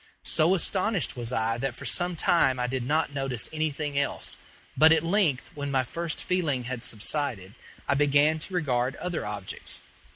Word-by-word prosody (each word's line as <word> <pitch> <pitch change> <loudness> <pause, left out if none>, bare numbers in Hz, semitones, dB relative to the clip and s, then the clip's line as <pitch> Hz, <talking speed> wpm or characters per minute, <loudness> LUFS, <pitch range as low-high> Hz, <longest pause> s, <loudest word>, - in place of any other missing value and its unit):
So 165 +4 +3
astonished 190 0 0
was 120 -1 -4
I 115 0 0
that 135 -2 -2
for - - -8
some 175 0 +1
time 135 -6 +3
I 125 - +1
did 130 +1 -2
not 145 +4 0
notice 135 -4 -1
anything 150 -2 -1
else; 140 - -2 0.4
but 160 +1 +7
at 160 -1 +5
length, 165 -7 +1
when 145 -2 -4
my 135 -2 +2
first 165 +6 -3
feeling 160 -9 0
had 125 -1 -4
subsided, 110 -4 -2 0.3
I - - +3
began 145 +2 +3
to 185 - -7
regard 130 -5 0
other 180 -10 -3
objects. 100 -2 -5
145 Hz, 170 wpm, -27 LUFS, 125-160 Hz, 0.4 s, but